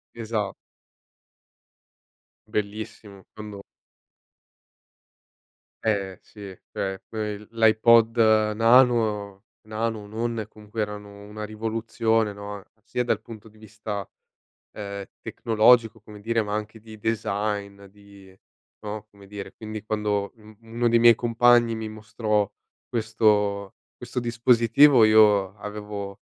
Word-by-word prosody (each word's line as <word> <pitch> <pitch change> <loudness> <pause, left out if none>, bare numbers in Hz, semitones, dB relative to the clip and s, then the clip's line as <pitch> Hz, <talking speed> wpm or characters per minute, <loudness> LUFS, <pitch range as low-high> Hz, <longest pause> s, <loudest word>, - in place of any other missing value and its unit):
Esa 110 -4 -3 1.9
Bellissimo 105 -1 -5
quando 105 -2 -9 2.2
Eh, 100 -4 -1
sì 100 -3 -11
cioè 95 -1 -3
que 110 -1 -4
il 105 0 -9
l'iPod 115 +1 +4 0.4
nano 115 -4 +3 0.2
nano 110 0 -2
o 105 - -11
non, 115 +1 -3
comunque 105 +1 -7
erano 105 -1 -6
una 105 +1 -8
rivoluzione, 110 0 -1
no, 100 0 -8 0.2
sia 125 - -2
dal 110 -3 -1
punto 110 -1 -12
di 110 - -22
vista, 105 -2 -6 0.7
ehm, 100 -1 -6 0.2
tecnologico 115 0 +3
come 105 0 -13
dire 115 +2 0
ma 105 -1 -4
anche 110 +1 -5
di 110 0 -13
design, 105 -2 -2
di 100 -1 -18 0.4
no, 105 0 -6
come 100 -1 -17
dire 100 0 -8
quindi 110 -1 -7
quando 105 -2 -1
un 110 0 -17
uno 115 +1 -1
dei 115 0 +4
miei 115 0 +7
compagni 120 0 +3
mi 110 -1 -5
mostrò 110 -1 -1 0.4
questo 105 -3 +1 0.2
questo 125 +1 -5
dispositivo 120 +2 +4
io 105 -2 +5
avevo 105 -1 -7
110 Hz, 110 wpm, -25 LUFS, 105-115 Hz, 2.2 s, miei